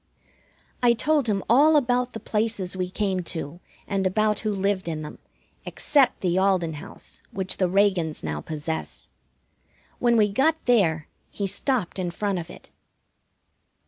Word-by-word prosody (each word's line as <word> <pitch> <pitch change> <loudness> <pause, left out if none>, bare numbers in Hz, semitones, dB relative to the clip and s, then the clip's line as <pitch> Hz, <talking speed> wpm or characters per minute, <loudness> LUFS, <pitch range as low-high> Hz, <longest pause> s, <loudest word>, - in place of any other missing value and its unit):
I 240 -1 +5
told 295 +2 +1
him 195 -2 0
about - - -28 0.4
all 250 0 +2
the 225 - -8
places 210 -5 -1
we 180 -1 -2
came 190 -1 -1 0.2
to, 160 +1 -5 0.3
and 195 -1 0
about 215 +2 +1
who 215 - -1
lived 195 -1 -1
in 155 -2 -3
them, 150 - -9 0.4
except 275 -4 +2
the 180 0 +1
Alden 185 -4 +2
house 145 - -9
which 190 -1 -2
the 185 -2 +1
Reagans 190 -5 +1
now 75 -1 -3
possess. 160 +1 -5 0.9
When 240 -1 +3
we 210 -2 +5
got 275 +9 +3
there 170 -11 +2 0.2
he 200 - -4
stopped 205 0 -1
in 180 -1 -1
front 195 +1 -2
of 165 - -7
it. - - -13
195 Hz, 150 wpm, -25 LUFS, 175-220 Hz, 0.9 s, I